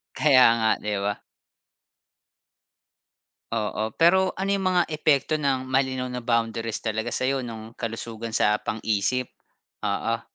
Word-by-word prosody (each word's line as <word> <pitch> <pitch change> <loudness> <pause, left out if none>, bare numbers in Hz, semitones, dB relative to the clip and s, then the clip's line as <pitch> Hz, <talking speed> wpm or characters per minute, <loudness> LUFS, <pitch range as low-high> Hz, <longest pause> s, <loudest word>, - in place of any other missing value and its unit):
Kaya 135 -4 +6 0.2
nga, 110 -1 +2
'di 105 0 -2
ba? 100 0 -2 2.3
Oo, 110 -1 -2
pero 185 +3 +5
ano 195 +1 -2
'yung 195 -1 -1
mga 180 -1 +3
epekto 155 -2 +1
ng 135 -2 0
malinaw 130 -1 0
na 125 - -4
boundaries 115 -1 -1
talaga 110 0 -1
sa'yo 135 +1 -1
no'ng 115 -2 -8
kalusugan 115 -1 -5
sa 105 0 +2
pang-isip? 110 +2 -1 0.5
Oo. - - -1
120 Hz, 120 wpm, -25 LUFS, 110-135 Hz, 2.3 s, Kaya